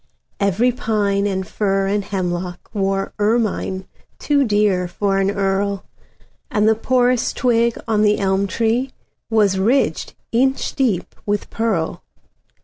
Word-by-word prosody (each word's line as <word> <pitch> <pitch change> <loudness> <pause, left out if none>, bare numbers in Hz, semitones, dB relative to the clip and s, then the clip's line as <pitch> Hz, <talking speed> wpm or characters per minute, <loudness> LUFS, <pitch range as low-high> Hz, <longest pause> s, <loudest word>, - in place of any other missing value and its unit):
Every 205 +5 +2
pine 205 -4 0
and 190 -2 -2
fir 195 -2 0
and 200 +1 0
hemlockWore 190 +1 -2
ermine 210 -3 0 0.3
too 285 -1 +2
dear 205 -5 +2
for 195 +2 0
an 195 0 +2
earl, 200 0 -1 0.6
And 210 0 +2
the 220 - +6
poorest 245 +1 +1
twig 235 -2 +2
on 215 -2 +2
the 210 0 +3
elm 195 0 +1
treeWas 220 -3 -1
ridged 255 +6 +1 0.2
inch 265 +3 +1
deep 230 -10 0
with 205 0 -1
pearl. 215 -8 -1
205 Hz, 120 wpm, -20 LUFS, 195-230 Hz, 0.6 s, the